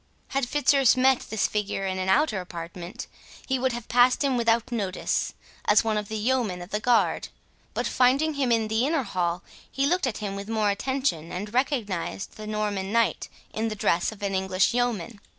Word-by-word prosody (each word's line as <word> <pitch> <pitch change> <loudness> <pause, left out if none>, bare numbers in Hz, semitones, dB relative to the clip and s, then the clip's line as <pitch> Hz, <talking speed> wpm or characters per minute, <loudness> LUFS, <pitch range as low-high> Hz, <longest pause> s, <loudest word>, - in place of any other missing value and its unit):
Had 270 -3 -1
Fitzurse 275 -3 +4
met 260 0 +4
this 220 - 0
figure 205 -2 -2
in 190 -1 -2
an 185 0 -1
outer 215 -2 +3
apartment, 175 +4 -7 0.4
he 265 -1 0
would 260 +1 +1
have 240 -1 -6
passed 245 +3 +4
him 275 -2 +2
without 230 0 +1
notice, 200 -6 -1 0.3
as 210 +2 +5
one 220 -1 0
of 210 -1 -2
the 220 - -4
yeomen 220 -4 0
of 175 - -13
the 210 - 0
guard; 240 +1 +2 0.5
but - - -1
finding 275 +5 +3
him 270 -4 0
in 225 -1 +2
the 220 +2 +1
inner 310 -3 +1
hall, 180 -4 -2 0.3
he 275 - 0
looked 350 0 +2
at 225 - -3
him 200 -2 -4
with 200 +2 -6
more 215 -2 +2
attention, 225 - -1
and 205 +4 -5
recognised 225 - -1
the 215 0 -8
Norman 205 -2 -2
knight 230 0 +1 0.2
in 220 +1 -1
the 215 - -3
dress 175 -3 +1
of 205 -2 -11
an 200 -1 -1
English 190 +1 +1
yeoman. 235 -4 -1
220 Hz, 195 wpm, -26 LUFS, 195-250 Hz, 0.5 s, as